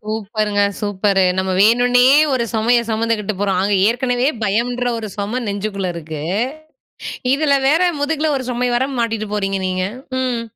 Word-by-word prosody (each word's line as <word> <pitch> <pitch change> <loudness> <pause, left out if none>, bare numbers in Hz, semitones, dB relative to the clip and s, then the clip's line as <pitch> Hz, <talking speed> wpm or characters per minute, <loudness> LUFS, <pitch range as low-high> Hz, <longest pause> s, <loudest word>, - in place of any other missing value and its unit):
சூப்பருங்க 215 -1 -1 0.2
சூப்பரு. 200 -2 +1
நம்ம 190 0 0
வேணுன்னே 245 +4 +4 0.3
ஒரு 255 -3 +1
சுமையை 235 +2 +2
சுமந்துக்கிட்டு 220 -2 -1
போறோம். 195 -2 +1
அங்கே 200 0 +1
ஏற்கனவே 245 +1 0 0.2
பயம்ன்ற 240 +5 0
ஒரு 220 -1 -5
சுமை 210 +5 -2
நெஞ்சுக்குள்ள 200 -1 -3
இருக்கு. 160 -2 -6 1.1
இதில 285 0 +2
வேற, 320 +6 +3 0.2
முதுகில 305 +1 0
ஒரு 260 - -5
சுமைய 245 0 -1
வேற 250 +2 +1
மாட்டிட்டு 225 -2 -1
போறீங்க 195 -1 -1
நீங்க. 185 0 -1 0.4
ம். 250 -2 -1
220 Hz, 140 wpm, -18 LUFS, 200-245 Hz, 1.1 s, வேணுன்னே